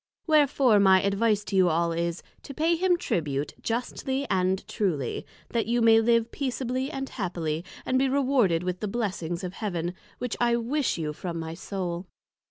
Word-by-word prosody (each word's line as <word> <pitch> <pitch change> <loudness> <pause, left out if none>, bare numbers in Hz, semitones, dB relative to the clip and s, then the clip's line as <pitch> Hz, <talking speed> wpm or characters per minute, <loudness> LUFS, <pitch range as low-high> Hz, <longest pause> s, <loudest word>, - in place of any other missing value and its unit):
Wherefore 280 -8 +4
my 190 -1 +5
advice 205 +1 +2
to 195 0 -4
you 185 -2 +5
all 170 +1 +1
is, 170 +1 -2 0.2
To 275 - -9
pay 330 +2 +2
him 355 +1 +2
Tribute 150 - -2
justly 265 +3 -2
and 185 0 +1
truly, 165 - -2 0.2
that 230 -2 -1
you 240 +1 +2
may 225 -1 +6
live 230 0 +2
Peaceably 260 -1 -2
and 270 -3 -4
Happily, 170 -8 -3 0.2
and 255 - +2
be 270 0 +2
rewarded 255 -11 +2
with 180 0 -2
the 210 - -2
Blessings 190 -6 -3
of 180 0 -4
Heaven: 175 -5 -3 0.2
which 250 -2 -3
I 235 0 +3
wish 250 +3 0
you 155 -2 -3
from 170 +2 -5
my 160 0 -5
Soul. 180 0 -4
205 Hz, 175 wpm, -27 LUFS, 175-255 Hz, 0.2 s, may